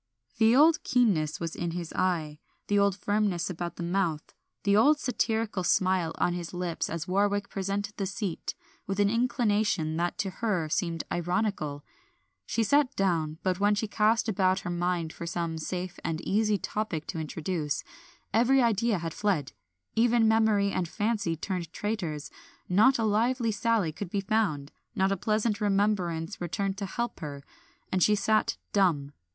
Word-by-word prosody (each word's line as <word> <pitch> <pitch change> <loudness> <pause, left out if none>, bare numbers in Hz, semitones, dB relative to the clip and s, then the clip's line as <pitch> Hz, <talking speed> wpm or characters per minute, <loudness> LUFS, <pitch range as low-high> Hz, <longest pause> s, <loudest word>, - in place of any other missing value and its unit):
The 225 +1 +5
old 310 +3 +6
keenness 195 - +2
was 165 -1 -4
in 170 -1 -2
his 170 -2 -5
eye, 165 -5 -1 0.3
the 205 0 +2
old 200 -1 +3
firmness 205 -4 0
about 175 0 -5
the 175 - -5
mouth, 170 -3 -1 0.3
the 200 0 +3
old 290 +8 +5
satirical 225 -6 -1
smile 185 -2 +2
on 175 - +1
his 175 0 -5
lips 175 -2 -2
as 165 -1 -4
Warwick 200 +2 +1
presented 200 +2 -3
the 195 - -1
seat, 195 -2 -4 0.3
with 195 +1 -2
an 205 0 +3
inclination 210 - +1
that 175 +1 -1
to 200 -2 -2
her 190 -8 0
seemed 165 0 -1
ironical. 175 -5 -1 0.6
She 230 - +1
sat 285 +4 +3
down, 165 -5 0
but 185 -1 0
when 205 +1 +3
she 215 +2 -1
cast 220 +3 +2
about 190 -2 +2
her 175 - -4
mind 175 -2 -1
for 170 - -7
some 165 -1 -2
safe 180 +2 -4
and 160 -1 -2
easy 210 +2 +1
topic 190 -6 -3
to 165 - -4
introduce, 155 -1 -3 0.5
every 245 +5 +4
idea 230 -2 +2
had 165 -2 -4
fled; 195 -10 0 0.4
even 230 0 +4
memory 220 -2 +3
and 185 -2 -1
fancy 205 -5 -1
turned 170 -1 -4
traitors; 175 -10 -3 0.4
not 215 +9 +5
a 230 - 0
lively 230 +3 +1
sally 220 -5 +1
could 175 +4 -6
be 200 +2 -1
found, 190 -9 0 0.2
not 190 +1 +2
a - - +2
pleasant 215 +2 0
remembrance 195 -4 0
returned 195 +3 -2
to 200 - -3
help 235 +3 -3
her, 140 -2 -6 0.5
and 185 - +1
she 210 +4 +5
sat 215 +2 +1 0.2
dumb. 165 -8 +2
195 Hz, 165 wpm, -28 LUFS, 170-215 Hz, 0.6 s, old